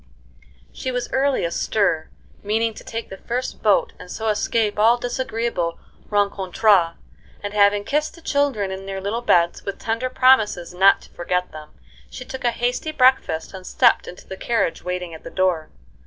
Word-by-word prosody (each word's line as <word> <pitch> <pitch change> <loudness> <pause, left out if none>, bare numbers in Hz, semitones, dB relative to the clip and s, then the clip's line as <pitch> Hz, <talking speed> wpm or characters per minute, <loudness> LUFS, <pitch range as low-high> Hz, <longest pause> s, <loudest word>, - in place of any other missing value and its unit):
She 260 - -4
was 250 -1 -3
early 270 -5 +1
astir, 170 -1 0 0.3
meaning 220 +2 0
to - - -11
take 230 0 -6
the 195 - -7
first 250 +2 -4
boat 210 -3 +2
and - - -11
so 220 +4 -2
escape 210 0 0
all 230 +3 +5
disagreeable 235 -8 -2 0.3
rencontres, 200 -3 +2 0.5
and 205 0 -4
having 205 0 +4
kissed 300 +6 -1
the 335 - -15
children 280 -11 0
in 190 +1 -7
their 195 0 -4
little 205 +5 -2
beds, 170 -7 +2
with 200 - -5
tender 230 +3 -2
promises 220 -10 +3
not 195 +2 +5
to - - -18
forget 180 +1 -2
them, 155 -1 -10 0.4
she 255 - -8
took 265 0 -7
a 240 - +3
hasty 245 +6 -2
breakfast 255 - +2
and 185 -1 -9
stepped 240 -3 +3
into 180 - -10
the 190 - -7
carriage 225 -7 -1
waiting 180 -1 -4
at 160 - -11
the - - -7
door. 180 -4 0
210 Hz, 170 wpm, -22 LUFS, 185-240 Hz, 0.5 s, all